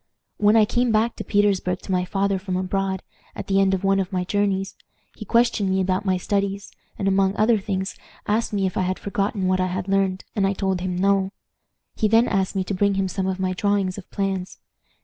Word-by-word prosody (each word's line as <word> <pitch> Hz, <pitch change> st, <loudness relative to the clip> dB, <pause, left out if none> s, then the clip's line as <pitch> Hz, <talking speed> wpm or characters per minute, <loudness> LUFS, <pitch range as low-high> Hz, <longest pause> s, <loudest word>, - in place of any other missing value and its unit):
"When 210 Hz, +1 st, +4 dB
I 220 Hz, -1 st, +6 dB
came 240 Hz, +2 st, +1 dB
back 220 Hz, +2 st, +2 dB
to -, -, -4 dB
Petersburg 200 Hz, -3 st, +1 dB
to -, -, -5 dB
my 180 Hz, -1 st, +1 dB
father 195 Hz, +1 st, 0 dB
from 185 Hz, -1 st, -3 dB
abroad, 190 Hz, 0 st, -2 dB, 0.3 s
at -, -, -6 dB
the 195 Hz, 0 st, +2 dB
end 190 Hz, 0 st, +3 dB
of 190 Hz, -, -6 dB
one 195 Hz, 0 st, +3 dB
of 190 Hz, 0 st, -2 dB
my 180 Hz, -1 st, -1 dB
journeys, 195 Hz, 0 st, -1 dB, 0.4 s
he -, -, -8 dB
questioned 230 Hz, -4 st, +2 dB
me 190 Hz, 0 st, +1 dB
about 190 Hz, +1 st, 0 dB
my 185 Hz, -1 st, +2 dB
studies, 200 Hz, +1 st, -2 dB, 0.3 s
and, 195 Hz, -, -1 dB
among 195 Hz, 0 st, +2 dB
other 220 Hz, 0 st, +3 dB
things, 190 Hz, -1 st, -3 dB, 0.3 s
asked 220 Hz, +3 st, 0 dB
me 200 Hz, -2 st, 0 dB
if 185 Hz, -, -2 dB
I -, -, +2 dB
had 185 Hz, 0 st, -1 dB
forgotten 200 Hz, -1 st, -2 dB
what 185 Hz, 0 st, +2 dB
I 185 Hz, -, +1 dB
had 185 Hz, +1 st, -3 dB
learned, 195 Hz, -1 st, 0 dB
and 195 Hz, -2 st, +2 dB
I 195 Hz, -, +1 dB
told 190 Hz, -2 st, -1 dB
him 180 Hz, -1 st, -2 dB
no. 195 Hz, +1 st, +2 dB, 0.6 s
He 215 Hz, -, +1 dB
then 225 Hz, +3 st, +4 dB
asked 195 Hz, -1 st, 0 dB
me 190 Hz, -, +1 dB
to 190 Hz, -, -4 dB
bring 200 Hz, +1 st, +2 dB
him 195 Hz, 0 st, 0 dB
some 190 Hz, +1 st, -2 dB
of 190 Hz, 0 st, -2 dB
my 185 Hz, -1 st, 0 dB
drawings 200 Hz, -1 st, 0 dB
of 185 Hz, -, -14 dB
plans. 195 Hz, -2 st, -3 dB
195 Hz, 225 wpm, -23 LUFS, 185-205 Hz, 0.6 s, I